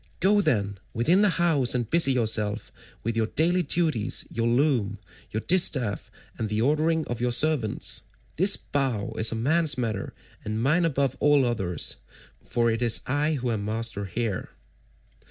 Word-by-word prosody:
Go, 205 Hz, +3 st, +4 dB
then, 100 Hz, -, 0 dB, 0.2 s
within 165 Hz, -, +3 dB
the 210 Hz, -, +5 dB
house 150 Hz, -8 st, +2 dB
and 120 Hz, -2 st, -1 dB
busy 165 Hz, 0 st, +3 dB
yourself 110 Hz, -3 st, -1 dB, 0.3 s
with 115 Hz, +1 st, -2 dB
your 110 Hz, -1 st, +1 dB
daily 175 Hz, +8 st, +1 dB
duties, 155 Hz, -8 st, 0 dB
your 115 Hz, 0 st, -1 dB
loom, 120 Hz, -5 st, +1 dB, 0.3 s
your 110 Hz, -, -3 dB
distaff, 130 Hz, -, +1 dB, 0.3 s
and 110 Hz, -, -2 dB
the 105 Hz, 0 st, -1 dB
ordering 155 Hz, +5 st, +1 dB
of 120 Hz, -1 st, -5 dB
your 125 Hz, 0 st, +1 dB
servants. 130 Hz, -4 st, 0 dB, 0.3 s
This 190 Hz, +5 st, +4 dB
bow 120 Hz, -6 st, -2 dB
is 110 Hz, 0 st, +2 dB
a -, -, -3 dB
man's 145 Hz, +5 st, +1 dB
matter, 110 Hz, -5 st, -3 dB, 0.3 s
and 110 Hz, +1 st, -3 dB
mine 150 Hz, +9 st, +2 dB
above 135 Hz, -4 st, 0 dB
all 145 Hz, -2 st, +4 dB
others, 95 Hz, -9 st, -1 dB, 0.5 s
for 120 Hz, -1 st, 0 dB
it 115 Hz, +2 st, -2 dB
is 120 Hz, -2 st, +1 dB
I 145 Hz, +4 st, 0 dB
who 125 Hz, -3 st, -2 dB
am 105 Hz, -3 st, -2 dB
master 110 Hz, -1 st, -2 dB
here." 105 Hz, +1 st, -3 dB
120 Hz, 160 wpm, -25 LUFS, 110-155 Hz, 0.5 s, the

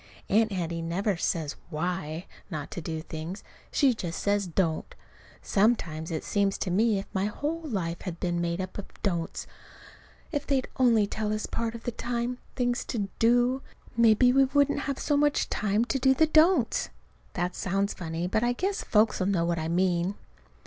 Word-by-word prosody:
Aunt 220 Hz, +2 st, +3 dB
Hattie 170 Hz, -3 st, -2 dB
never 185 Hz, +5 st, 0 dB
says 160 Hz, -3 st, -1 dB
why 170 Hz, 0 st, -3 dB, 0.2 s
not 150 Hz, -5 st, -5 dB
to 175 Hz, -, -5 dB
do 160 Hz, 0 st, -4 dB
things. 165 Hz, +4 st, -6 dB, 0.3 s
She 275 Hz, -4 st, +4 dB
just 175 Hz, -7 st, -4 dB
says, 200 Hz, -1 st, +1 dB
"Don't." 165 Hz, -2 st, -1 dB, 0.5 s
Sometimes 170 Hz, -7 st, +1 dB
it 160 Hz, -2 st, -3 dB
seems 200 Hz, -1 st, +1 dB
to 185 Hz, -, -2 dB
me 215 Hz, +3 st, +3 dB
as 195 Hz, -, -3 dB
if -, -, -31 dB
my 190 Hz, 0 st, +1 dB
whole 295 Hz, +10 st, -2 dB
life 190 Hz, -, -3 dB
had 175 Hz, -3 st, -5 dB
been 175 Hz, -2 st, -1 dB
made 170 Hz, +1 st, -1 dB
up 185 Hz, +1 st, -4 dB
of 200 Hz, -, -6 dB, 0.2 s
"don'ts." 170 Hz, -5 st, -1 dB, 0.9 s
If 290 Hz, -3 st, -2 dB
they'd 270 Hz, -2 st, +1 dB
only 235 Hz, -5 st, +5 dB
tell 210 Hz, +1 st, -2 dB
us 215 Hz, 0 st, -1 dB
part 230 Hz, 0 st, -3 dB
of 230 Hz, -, -8 dB
the 240 Hz, -, -2 dB
time 240 Hz, +1 st, -3 dB, 0.2 s
things 245 Hz, -1 st, 0 dB
to 205 Hz, -4 st, -2 dB
"do," 245 Hz, +3 st, +3 dB, 0.3 s
maybe 235 Hz, +2 st, +5 dB
we 270 Hz, 0 st, +6 dB
wouldn't 285 Hz, +1 st, +2 dB
have 275 Hz, -, -1 dB
so 295 Hz, -, 0 dB
much 290 Hz, 0 st, +2 dB
time 210 Hz, +2 st, +1 dB
to 270 Hz, -, -1 dB
do 265 Hz, +1 st, +4 dB
the 315 Hz, -, +5 dB
"don'ts." 315 Hz, -4 st, +4 dB, 0.4 s
(That 180 Hz, 0 st, -1 dB
sounds 195 Hz, +2 st, -1 dB
funny, 165 Hz, 0 st, -4 dB
but 190 Hz, +4 st, +1 dB
I 240 Hz, 0 st, +2 dB
guess 385 Hz, +9 st, -1 dB
folks'll 210 Hz, -3 st, +2 dB
know 180 Hz, -4 st, +2 dB
what 170 Hz, -1 st, 0 dB
I 160 Hz, -, -2 dB
mean.) 175 Hz, +2 st, +1 dB
200 Hz, 185 wpm, -28 LUFS, 175-245 Hz, 0.9 s, we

